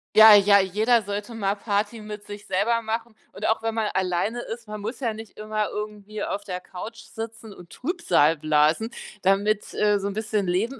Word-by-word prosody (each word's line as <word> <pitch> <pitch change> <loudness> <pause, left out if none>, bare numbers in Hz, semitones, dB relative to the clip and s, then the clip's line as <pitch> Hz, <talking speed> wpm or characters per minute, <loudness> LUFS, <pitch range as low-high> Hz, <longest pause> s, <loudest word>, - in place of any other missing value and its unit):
Ja, 220 0 +10
ja. 200 0 +7
Jeder 220 +5 +2
sollte 205 +3 -5
mal 200 -2 0
Party 210 +2 -1
mit 210 -1 -8
sich 205 0 -9
selber 230 +5 +1
machen 225 +1 -3 0.2
und - - -5
auch 220 - +1
wenn 225 0 -2
man 220 -2 0
alleine 190 +5 0
ist, 230 0 -7
man 210 0 -7
muss 225 +7 -5
ja 230 -3 0
nicht 220 -1 -11
immer 215 0 -2
irgendwie 210 0 -6
auf 200 0 -3
der 180 -1 -4
Couch 225 +5 -8
sitzen 225 -1 -8
und 175 -2 -14
Trübsal 245 - +1
blasen. 155 +8 +2 0.3
Damit, 200 +2 +1
äh, 210 -1 +2
so 200 - -3
'n 200 - -3
bisschen 215 -2 -1
Leben 220 +10 -1
210 Hz, 195 wpm, -25 LUFS, 200-225 Hz, 0.3 s, Ja